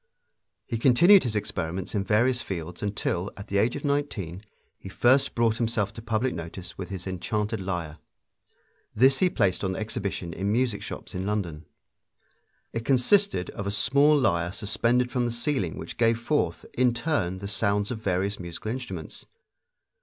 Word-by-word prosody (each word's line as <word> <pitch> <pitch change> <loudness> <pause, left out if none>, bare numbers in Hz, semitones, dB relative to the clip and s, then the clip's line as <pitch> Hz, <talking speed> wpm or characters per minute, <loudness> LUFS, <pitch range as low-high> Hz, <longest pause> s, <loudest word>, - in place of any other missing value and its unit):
He 115 -3 -3
continued 175 - +7
his 115 -4 -2
experiments 95 -3 -3
in 100 -2 0
various 120 +6 +2
fields 90 -2 -6
until, 100 -2 -1
at 100 - -9
the 100 - +1
age 115 +4 +2
of 145 - -5
nineteen, 110 - -2 0.4
he 95 - -9
first 130 +8 +3
brought 115 -1 +2
himself 110 -4 0
to 115 - -8
public 115 +3 0
notice 85 +2 -6
with 95 -2 -6
his 95 -2 -6
enchanted 105 +4 -2
lyre. 85 -5 -4 1.0
This 135 +4 +5
he 185 - +4
placed 95 - +1
on 95 -1 -1
exhibition 100 -5 -3
in 100 +4 -1
music 120 -2 +1
shops - - -7
in 95 +1 -3
London. 90 -7 -3 1.1
It 115 - -3
consisted 135 - +3
of 100 - -5
a - - +1
small 140 +9 +4
lyre 90 -10 +1
suspended 120 +5 0
from 125 -1 0
the - - -2
ceiling 120 - -1
which - - -7
gave 115 0 +3
forth, 115 - -1
in 125 -1 +2
turn, 120 - -1
the 100 +1 -6
sounds 100 +1 0
of 110 -3 -5
various 100 0 -1
musical 90 +4 -5
instruments. 95 - -7
105 Hz, 165 wpm, -26 LUFS, 95-125 Hz, 1.1 s, continued